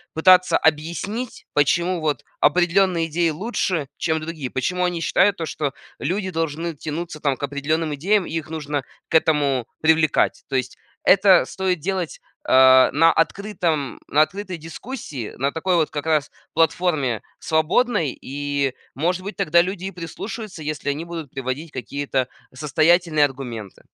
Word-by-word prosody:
пытаться 185 +3 +5
объяснить, 170 +10 -1
почему 170 +4 +2
вот 150 -2 -1 0.2
определенные 175 +2 +3
идеи 165 +1 +1
лучше, 170 - -2
чем 160 -1 0
другие. 155 -4 -5
Почему 180 +8 -1
они 175 -2 -1
считают 195 +3 +3
то, 165 - -3
что 145 -3 -3 0.3
люди 190 +1 -2
должны 165 +1 -2
тянуться 155 +2 -5
там 140 -3 0
к - - -10
определенным 150 +3 -1
идеям 190 +7 +1
и - - -8
их 160 -1 -3
нужно 150 -3 -3 0.3
к - - -10
этому 140 -6 +2
привлекать. 160 -1 +3
То 135 - -2
есть 130 0 -2 0.3
это 190 -2 +6
стоит 185 -3 -1
делать, 185 0 -3 0.3
а, 130 0 +7
на 165 +4 +5
открытом 170 -6 -1
на 150 - +3
открытой 185 +3 -2
дискуссии, 160 - -7
на 140 +3 0
такой 175 +4 0
вот 160 -3 +2
как 145 0 -5
раз 155 -3 +1 0.2
платформе 160 - +1 0.2
свободной, 160 - +1
и, 140 -1 -2 0.2
может 180 +5 0
быть, 200 - -6
тогда 170 -3 +4
люди 185 +1 -4
и 195 - -3
прислушаются, 185 +2 -7
если 150 -1 -3
они 150 +4 -2
будут 165 -5 -7
приводить 135 +4 -4
какие-то 135 +1 -2 0.3
состоятельные 155 +2 +3
аргументы. 120 -7 -7
160 Hz, 150 wpm, -22 LUFS, 145-180 Hz, 0.3 s, а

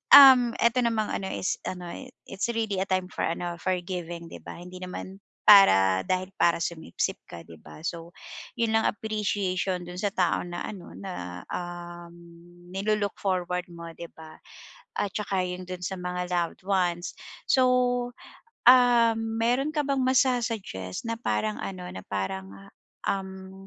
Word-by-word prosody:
um, 255 -4 +9
eto 235 +2 +3
namang 225 -3 +1
ano 190 - -2
is 190 - -2
ano 180 -2 -5
eh, 265 - -8 0.2
it's 195 +3 -3
really 220 -4 -1
a 195 - -1
time 185 -1 -1
for - - -1
ano, 170 +1 -3
for 185 +1 0
giving, 170 -2 -6
di - - -8
ba, - - -9
hindi 180 +1 -10
naman 185 +1 -7 0.2
para 95 - +7
dahil 185 +1 -1
para 170 0 +3
sumipsip 160 - -3
ka, 85 -1 -9
'di 80 -1 -14
ba? 75 0 -13
So, 170 +1 -5 0.4
yun 230 -1 +1
lang, 220 0 +3
appreciation 195 -4 -1
dun 180 +1 -8
sa 205 - +1
tao 180 -2 +2
na 175 0 -5
ano 190 -5 -8
na, 90 - -7
um, 175 -1 -6 0.6
nilo-look 205 +1 -1
forward 180 -2 -1
mo, 170 -1 -9
'di 170 +1 -9
ba? 160 -1 -12 0.6
At 200 - -1
tsaka 195 -3 0
yung 180 0 -5
dun 180 -1 -6
sa 190 +2 -2
mga 180 0 -3
loved 175 -1 -1
ones. 180 -3 +1 0.4
So, 260 - +5 1.1
ah, 245 -2 +7
meron 230 +6 0
ka 295 - +2
bang 275 -1 +1
masu-suggest 235 - 0
na 230 0 -2
parang 105 - -1
ano, 95 -2 -5
na 95 +1 -8
parang, 95 -1 -3 0.6
um, 190 0 -4
185 Hz, 155 wpm, -27 LUFS, 170-215 Hz, 1.1 s, um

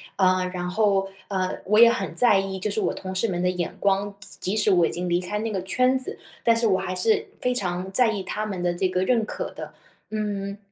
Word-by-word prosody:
呃， 185 -1 +2
然 180 0 -3
后， 195 -1 +2 0.2
呃， 185 -2 -1
我 210 +3 +2
也 235 0 +9
很 245 - -3
在 225 -6 +5
意， 195 0 -3
就 210 - -2
是 215 - -1
我 - - 0
同 190 -1 -6
事 205 +5 0
们 175 -2 -2
的 180 - +2
眼 180 -2 -3
光， 200 0 +1
即 195 -2 -6
即 - - 0
使 210 -1 +3
我 175 -2 +5
已 - - -4
经 180 +1 -3
离 175 +1 +2
开 205 +4 -3
那 220 0 -2
个 190 -2 -2
圈 255 +7 +2
子， 255 - -4 0.3
但 230 -1 +5
是 230 0 +1
我 190 -2 +2
还 185 - -3
是 435 - +1
非 250 0 +1
常 185 -4 -3
在 240 +2 +3
意 200 -3 -3
他 215 +3 -3
们 190 -4 -4
的 175 0 +1
这 185 +1 +1
个 185 0 0
认 230 +1 +2
可 - - -5
的。 - - -9 0.4
嗯， 205 -2 -3
195 Hz, 270 characters per minute, -24 LUFS, 185-215 Hz, 0.4 s, 也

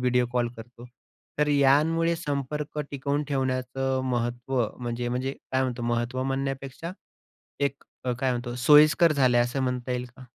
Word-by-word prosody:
Video 125 -1 +2
call 120 -1 +1
करतो. 120 +2 -11 0.5
तर 150 - +3
यामुळे 150 +4 +3
संपर्क 150 -1 -3
टिकवून 140 +1 -1
ठेवण्याचं 130 -1 -1
महत्त्व 120 +2 -1 0.2
म्हणजे 120 0 -3
म्हणजे 130 +2 -2 0.2
काय 130 0 +2
म्हणतो 125 -2 -2
महत्त्व 120 +2 -1
म्हणण्यापेक्षा 135 +4 -3 0.7
एक 140 -1 -1 0.2
अ, 125 - 0
काय 130 +2 0
म्हणतो, 120 0 -3
सोयीस्कर 150 +5 +6
झालंय 130 -4 +4
असं 120 +3 0
म्हणता 125 -1 -2
येईल 125 0 -1
का? 130 - -12
130 Hz, 145 wpm, -26 LUFS, 125-140 Hz, 0.7 s, सोयीस्कर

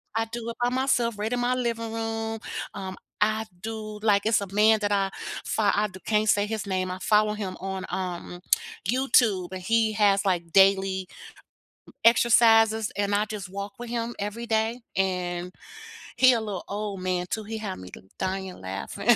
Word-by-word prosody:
I 225 - +1
do 235 -1 -4
it 230 - -6
by 240 - +3
myself 245 -3 +1
right 215 +3 -2
in 245 - 0
my 245 +1 +1
living 230 -2 -2
room. 225 0 -3 0.3
Um, 190 -2 -6 0.2
I 220 +1 +2 0.2
do 215 -1 -6
like, 205 -2 +3
it's 220 -1 +3
a 200 - -4
man 215 +1 +5
that 205 - 0
I 195 -1 +2 0.4
fo 220 - 0
I 205 +1 +3 0.2
can't 215 0 +2
say 205 0 +4
his 215 -2 -4
name 185 -1 -1
I 185 - -5
follow 210 0 +3
him 200 -3 -4
on, 190 0 -4
um, 180 -1 -4 0.5
YouTube 230 -7 +3
and 185 - -5
he 220 +3 +2
has, 200 -2 +3
like, 180 -3 +1
m 195 0 +6 1.2
exercises 225 -2 +5
and 205 0 +1
I 210 - +3
just 210 -3 -6
walk 200 +1 -6
with 240 - -7
him 235 0 -3
every 210 +4 -4
day 225 +2 0 0.2
and 180 -2 -1 0.7
he 255 -1 +7
a 230 - 0
little 205 -4 -4
old 200 -2 -4
man 180 -1 -1
too 220 - -2
he 220 +2 -5
had 200 -3 -4
me 90 - -10 0.3
dying 190 0 -3
laughing. 100 - +1
210 Hz, 180 wpm, -26 LUFS, 195-225 Hz, 1.2 s, he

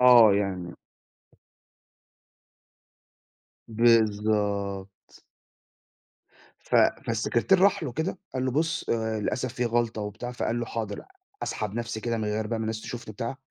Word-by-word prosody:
آه. 120 -5 +8
يعني 95 -4 -2 2.9
بالضبط. 105 -4 +1 1.4
ف - - -5 0.3
فالسكرتير 180 +11 +2
راح 200 -3 +4
له 130 -5 -3
كده 165 +6 -2 0.2
قال 130 0 -1
له: 130 - +1
"بُص، 160 +5 -1
آآ 110 -1 0
للأسف 125 +3 -2
في 125 - -1
غلطة،" 115 -2 0
وبتاع. 120 +4 -5
فقال 120 -1 -1
له: 120 - -3
"حاضر 110 -3 -4 0.4
أسحب 105 -1 -3
نفسي 115 -1 -3
كده 115 0 -1
من 110 - -2
غير 105 +1 -1
بقى 115 +1 -2
ما - - -2
الناس 110 0 -3
تشوفني،" 120 -3 -7
بتاع. 115 +5 -4
115 Hz, 130 wpm, -27 LUFS, 105-120 Hz, 2.9 s, آه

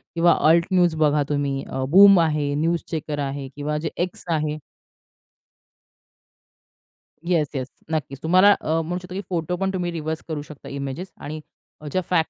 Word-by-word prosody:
किंवा 170 +1 +4
alt 170 +1 +5
news 175 -3 +3
बघा 150 -1 +2
तुम्ही, 140 -2 -1
अ, 130 - -3
बूम 195 +2 +8
आहे, 150 -3 +1
न्यूज 165 +3 0
चेकर 150 -2 -3
आहे 140 -1 -3
किंवा 150 +1 -2
जे 160 +1 -3 0.2
X 180 - -10
आहे. 150 0 -1 2.7
Yes, 170 -4 +2
yes. 130 -1 -2 0.2
नक्कीच 140 -3 -3
तुम्हाला 185 +5 +6
अ, 160 +1 0
म्हणू 175 +3 -3
शकतो, 180 0 -10
की 195 - -3
फोटो 175 -1 -1
पण 195 +1 -1
तुम्ही 175 -2 -2
रिव्हर्स 160 -1 -4
करू 155 -3 -3
शकता 150 -1 -11
इमेजेस 140 +6 -5
आणि 155 +2 -6 0.5
ज्या 185 - +1
फॅक्ट 165 -3 +2
160 Hz, 160 wpm, -23 LUFS, 145-175 Hz, 2.7 s, बूम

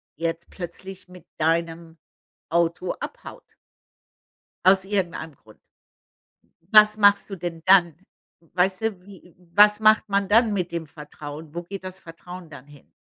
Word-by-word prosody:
jetzt 165 0 -4
plötzlich 185 +1 -9
mit 180 -2 -15
deinem 165 +1 -1 0.5
Auto 170 +2 0
abhaut - - -9 1.2
aus 190 0 +5
irgendeinem 180 -6 -3
Grund. 110 -4 -21 1.1
Was 215 0 +7
machst 205 -1 +4
du 195 - -5
denn 170 -2 -6
dann? 180 -4 +5 0.6
Weißt 185 +2 +1
du, 215 -5 -3
wie 185 -4 -16 0.2
was 210 +1 +6
macht 215 0 +4
man 200 -1 0
dann 225 +1 +4
mit 180 -3 -2
dem 170 -1 -4
Vertrauen? 150 +1 -11
Wo 175 - -4
geht 190 +2 -9
das 185 0 -7
Vertrauen 175 +1 -11
dann 145 -2 -13
hin? 145 -1 -19
180 Hz, 140 wpm, -23 LUFS, 165-200 Hz, 1.2 s, Was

